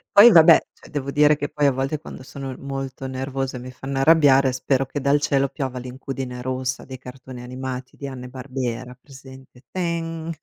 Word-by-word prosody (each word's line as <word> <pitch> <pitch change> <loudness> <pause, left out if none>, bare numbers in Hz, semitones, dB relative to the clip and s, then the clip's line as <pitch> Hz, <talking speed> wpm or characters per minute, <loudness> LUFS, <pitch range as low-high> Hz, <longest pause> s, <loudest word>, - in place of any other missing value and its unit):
Poi 220 +4 +10
vabbè, 165 -3 +8
cioè - - -17
devo 140 -2 -3
dire 150 +1 +5
che 145 - -3
poi 145 -1 +2
a - - +4
volte 135 +3 -2
quando 150 - -10
sono 135 0 -7
molto 135 -1 -5
nervosa 130 0 -3
e - - -6
mi 125 +1 -8
fanno 135 +1 -4
arrabbiare, 140 -3 +5
spero 130 +1 0
che 140 +2 -4
dal 140 +1 +2
cielo 140 -2 +2
piova 130 -1 -4
l'incudine 125 0 -6
rossa 130 0 -2
dei 130 -1 -8
cartoni 130 0 -10
animati 130 0 -6
di 140 - -6
Hanna 130 -2 -7
e - - -9
Barbera 130 -1 -5
presente? 130 -1 -15
Teng! 165 -2 -3
135 Hz, 190 wpm, -23 LUFS, 130-140 Hz, -, Poi